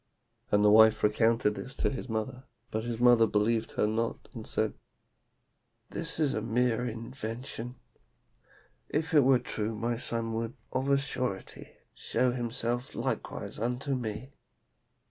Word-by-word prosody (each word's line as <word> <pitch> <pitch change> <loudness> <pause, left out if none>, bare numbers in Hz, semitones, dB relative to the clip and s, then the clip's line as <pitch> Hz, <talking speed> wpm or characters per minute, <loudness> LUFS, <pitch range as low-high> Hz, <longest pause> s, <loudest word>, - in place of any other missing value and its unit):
And 105 0 +4
the 105 - +7
wife 110 +1 +6
recounted 110 0 +3
this 130 +5 -6
to - - 0
his 130 -1 -5
mother, 125 +4 -3 0.3
but 110 +1 -2
his 120 -1 -3
mother 120 -2 +6
believed 110 +2 +1
her - - +2
not, 115 +2 -2
and - - -7
said, - - 0 1.2
'This 165 -1 -1
is 145 -3 +3
a 110 - -1
mere 120 +1 +1
invention. 115 +1 -6 1.1
If 160 +3 -1
it 150 -3 +7
were 130 0 +6
true 110 -2 -3
my 115 +2 -1
son 115 -1 -1
would, 115 +1 -3 0.2
of 130 +2 0
a 140 - +5
surety, 130 -7 -3 0.2
show 125 -1 0
himself 120 0 -2
likewise - - -3
unto 125 +5 -1
me. 120 +1 -4
115 Hz, 145 wpm, -30 LUFS, 110-130 Hz, 1.2 s, the